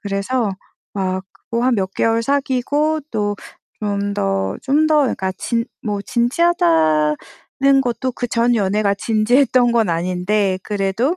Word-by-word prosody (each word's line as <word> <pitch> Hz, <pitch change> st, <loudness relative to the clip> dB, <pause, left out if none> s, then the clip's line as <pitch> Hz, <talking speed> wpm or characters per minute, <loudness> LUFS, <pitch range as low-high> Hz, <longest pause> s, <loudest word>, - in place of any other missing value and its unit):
그래서 205 Hz, +3 st, -1 dB, 0.4 s
막 190 Hz, -1 st, -2 dB, 0.3 s
뭐 235 Hz, +1 st, +1 dB
한 255 Hz, -1 st, +3 dB
몇 190 Hz, -3 st, -2 dB
개월 225 Hz, 0 st, +1 dB
사귀고 285 Hz, +4 st, 0 dB
또 205 Hz, -2 st, -1 dB, 0.5 s
좀 200 Hz, -1 st, -1 dB
더 95 Hz, -, -1 dB
좀 290 Hz, +3 st, +2 dB
더 310 Hz, -1 st, +4 dB
그러니까 190 Hz, -8 st, -1 dB
진 230 Hz, +2 st, -1 dB, 0.2 s
뭐 205 Hz, -2 st, -2 dB
진지하다는 170 Hz, -, +2 dB, 0.7 s
것도 250 Hz, +1 st, -2 dB
그 245 Hz, -, -3 dB
전 235 Hz, +1 st, +2 dB
연애가 200 Hz, -1 st, +1 dB
진지했던 240 Hz, +4 st, +2 dB
건 230 Hz, -4 st, +2 dB
아닌데 185 Hz, +3 st, 0 dB
그래도 210 Hz, -, -1 dB
215 Hz, 245 characters per minute, -19 LUFS, 195-250 Hz, 0.7 s, 더